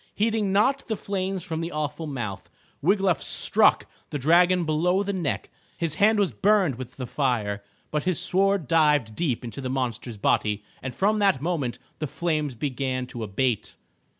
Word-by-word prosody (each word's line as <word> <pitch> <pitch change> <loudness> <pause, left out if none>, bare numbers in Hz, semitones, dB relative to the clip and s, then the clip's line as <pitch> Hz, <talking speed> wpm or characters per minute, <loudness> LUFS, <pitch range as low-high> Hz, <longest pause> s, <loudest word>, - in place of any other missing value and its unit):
Heeding 215 -2 +1
not 265 +8 +2
the 220 - -1
flames 190 -2 -3
from 160 -2 -3
the 165 +1 -4
awful 150 +1 -3
mouth, 120 -9 -5 0.3
Wiglaf 195 +1 +2
struck - - +3 0.2
the - - -3
dragon 175 +5 +4
below 175 +5 +2
the 200 0 -2
neck. 175 -7 -2 0.3
His 165 -4 -1
hand 215 +1 +5
was 200 -3 +2
burned 195 - +2
with 125 -1 -8
the 130 - -4
fire, 110 -7 -1 0.3
but 150 -1 -1
his 185 -3 +1
sword 195 -3 +2
dived 150 -8 +3
deep 135 -8 -1
into 115 +3 -6
the 130 - -3
monster's 125 -3 -3
body 105 +1 +1 0.2
and 130 -2 -5
from 210 +2 +2
that 195 -10 +3
moment 145 -7 -2 0.2
the 155 - -2
flames 155 -3 -1
began 130 0 -2
to 120 -1 -8
abate. 110 +2 -1
155 Hz, 170 wpm, -25 LUFS, 130-190 Hz, 0.3 s, hand